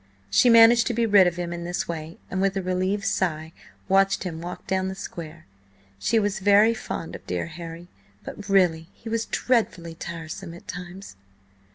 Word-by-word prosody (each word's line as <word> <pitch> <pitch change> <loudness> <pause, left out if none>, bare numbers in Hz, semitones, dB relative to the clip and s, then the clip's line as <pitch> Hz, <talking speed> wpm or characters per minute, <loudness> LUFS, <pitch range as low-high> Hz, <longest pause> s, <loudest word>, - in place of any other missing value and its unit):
She 245 - +5
managed 230 0 +7
to 240 - -1
be 235 0 +2
rid 200 -4 +6
of 175 - -1
him 175 -1 -4
in 170 0 -5
this 175 +1 -3
way, 160 -1 -6
and, 190 - -1
with 195 0 +1
a - - 0
relieved 185 +3 -1
sigh, 160 -5 -1 0.3
watched 195 +1 +3
him 165 -3 -5
walk 175 +1 -7
down 190 0 0
the 190 - -4
square. 165 -4 -8 0.5
She 230 - +1
was 205 -1 0
very 205 +3 +5
fond 165 -6 -6
of - - -12
dear - - -2
Harry, 170 +1 -9 0.4
but 205 0 -8
really, 175 -5 +3
he 230 - -9
was 230 0 -1
dreadfully 185 -9 0
tiresome 165 +1 -7
at 175 - -15
times. 180 - -8
185 Hz, 185 wpm, -25 LUFS, 170-205 Hz, 0.5 s, managed